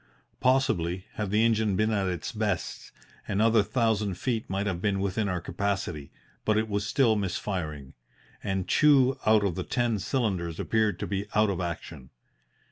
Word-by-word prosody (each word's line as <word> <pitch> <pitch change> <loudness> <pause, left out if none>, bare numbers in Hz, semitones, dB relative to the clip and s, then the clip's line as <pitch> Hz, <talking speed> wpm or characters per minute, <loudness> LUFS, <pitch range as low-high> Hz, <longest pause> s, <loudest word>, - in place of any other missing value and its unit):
Possibly, 105 -9 +1
had 105 -2 -3
the 105 +3 +3
engine 110 -3 +2
been 110 +3 +1
at 100 -3 0
its 90 -2 -3
best, 105 -6 -3 0.4
another 110 +2 +3
thousand 105 -3 0
feet 115 +3 -2
might 95 +2 -1
have 90 -4 -2
been 100 -1 +1
within 100 +2 -1
our 90 -1 -1
capacity, 90 -6 -3 0.3
but 110 -1 +2
it 110 +1 +1
was 100 -1 -2
still 125 -6 +3
missfiring, 90 -8 -3 0.5
and 95 -1 -2
two 135 - +4
out 110 -1 +5
of 95 - 0
the 95 - -3
ten 120 -1 0
cylinders 95 - -1
appeared 110 -2 +1
to - - -1
be 100 +1 -3
out 105 -1 +4
of 95 -2 -3
action. 85 -6 -6
100 Hz, 165 wpm, -27 LUFS, 90-110 Hz, 0.5 s, out